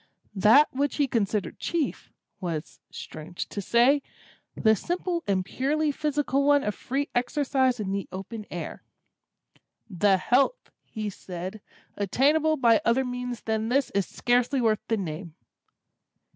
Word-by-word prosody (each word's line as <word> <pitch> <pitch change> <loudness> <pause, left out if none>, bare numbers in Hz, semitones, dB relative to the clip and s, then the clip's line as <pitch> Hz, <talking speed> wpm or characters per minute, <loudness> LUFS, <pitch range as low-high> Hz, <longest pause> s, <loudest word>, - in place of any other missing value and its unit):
That 215 +9 +5
which 280 +2 0
he 290 -2 +2
considered 210 -4 -1
chief, 335 -4 -2 0.3
was 170 -4 -5
(strange 155 +3 -7
to 200 - -4
say!) 245 +8 +4 0.5
the 220 -1 +4
simple 350 - -2
and 190 -2 +1
purely 295 +8 0
physical 285 -2 0
one 285 0 +4
of 210 - -1
free 275 +7 -3
exercise 260 -1 +1
in 195 -2 -2
the 200 0 -2
open 205 +3 -7
air. - - -6 1.1
"The 195 0 +3
health," 275 - +1 0.2
he 215 -2 -4
said, 185 +2 -7 0.3
"attainable 295 - +2
by 235 -4 +4
other 255 +3 +2
means 250 -1 -4
than 220 0 -1
this 270 +2 +1
is 200 -1 0
scarcely 245 +3 +1
worth 220 -3 +2
the 225 - +1
name." 165 -2 -5
240 Hz, 135 wpm, -26 LUFS, 200-280 Hz, 1.1 s, That